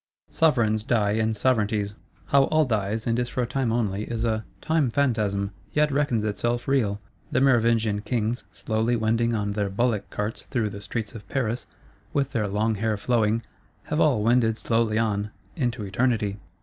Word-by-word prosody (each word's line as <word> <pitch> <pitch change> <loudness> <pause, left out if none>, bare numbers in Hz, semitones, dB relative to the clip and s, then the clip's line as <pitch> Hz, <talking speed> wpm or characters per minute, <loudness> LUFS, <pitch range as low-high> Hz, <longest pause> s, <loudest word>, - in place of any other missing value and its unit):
Sovereigns 115 -9 +3
die 110 -3 +1
and 110 0 0
Sovereignties: 105 -4 +1 0.4
how 140 -1 +5
all 155 +1 +3
dies, 110 -2 -1
and 115 0 +1
is 120 -1 -1
for 125 - -1
a - - 0
Time 125 -1 -1
only; 105 -3 0
is 115 0 -2
a 110 -1 0 0.2
"Time 160 -4 +1
phantasm, 105 -7 0 0.2
yet 150 0 +3
reckons 140 -6 +1
itself 120 +3 -1
real!" 115 -7 +1 0.3
The 130 - +2
Merovingian 115 -5 +3
Kings, 115 +1 -1
slowly 110 +2 0
wending 115 +1 +1
on 105 -1 -1
their 100 -1 -1
bullock 110 +1 0
carts 105 +2 -4
through 115 -5 0
the 100 - -8
streets 110 0 -4
of 105 -4 -11
Paris, 120 -3 -1 0.5
with 140 -1 0
their 110 -5 0
long 105 +3 +1
hair 110 +1 -1
flowing, 115 0 +1 0.4
have 150 - -2
all 130 -10 +3
wended 115 -1 +3
slowly 115 -2 +1
on,—into 105 +2 -2
Eternity. 105 -1 0
115 Hz, 165 wpm, -25 LUFS, 105-125 Hz, 0.5 s, how